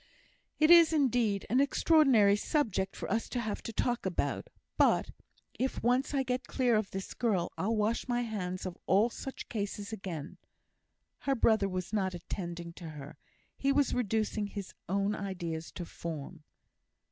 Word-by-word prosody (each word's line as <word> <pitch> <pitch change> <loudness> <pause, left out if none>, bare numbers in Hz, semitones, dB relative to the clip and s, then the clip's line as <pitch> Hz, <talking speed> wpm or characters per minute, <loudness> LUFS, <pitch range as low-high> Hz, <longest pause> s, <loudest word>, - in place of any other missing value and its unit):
"It 310 +2 +5
is, 335 -2 +8
indeed, 245 -9 +2
an 250 - +2
extraordinary 275 -8 +5
subject 210 - 0
for - - -5
us 225 +2 0
to 250 - -2
have 220 -3 -3
to - - -6
talk 240 +2 0
about; 190 -2 -2 0.3
but - - +3 0.5
if 260 +1 -1
once 250 +3 +2
I 270 - +2
get 250 0 -2
clear 250 -3 +2
of 215 -2 0
this 190 0 -5
girl, 195 -8 0
I'll 220 +4 0
wash 215 +3 0
my 245 -1 +1
hands 190 -6 -3
of 185 -1 -6
all 210 +5 +4
such 270 - -7
cases 205 0 -4
again." 180 -8 -6 0.8
Her 275 -1 0
brother 220 -4 +3
was 185 +1 -4
not 190 -3 0
attending 170 -1 -6
to 165 - -6
her; 150 -1 -10 0.4
he 275 - +1
was 280 -1 +2
reducing 220 -2 0
his 200 -2 -7 0.2
own 200 +2 +1
ideas 175 -6 -4
to 175 - -5
form. 160 -1 -7
210 Hz, 160 wpm, -31 LUFS, 185-245 Hz, 0.8 s, is